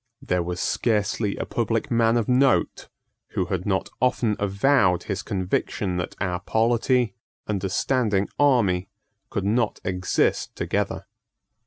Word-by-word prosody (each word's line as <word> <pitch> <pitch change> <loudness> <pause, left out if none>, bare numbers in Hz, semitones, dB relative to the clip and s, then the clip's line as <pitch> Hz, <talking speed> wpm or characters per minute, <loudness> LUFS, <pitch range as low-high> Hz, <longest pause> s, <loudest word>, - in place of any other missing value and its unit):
There 90 -1 -1
was 90 +1 -4
scarcely 105 -2 0
a - - -3
public 115 0 -1
man 115 0 +3
of 115 - 0
note 130 +2 +2 0.4
who 95 - 0
had 90 0 -3
not 95 -2 0
often 120 -4 +2
avowed 100 -2 +2
his 100 -1 -3
conviction 95 -1 -2
that 90 - -4
our 90 -3 -1
polity 115 +3 +1 0.3
and 100 -3 -2
a 95 - -1
standing 105 -2 +1
army 100 -10 +3 0.4
could 100 - -2
not 110 +2 +1
exist 90 -1 0
together. 100 -1 -2
100 Hz, 135 wpm, -24 LUFS, 95-115 Hz, 0.4 s, man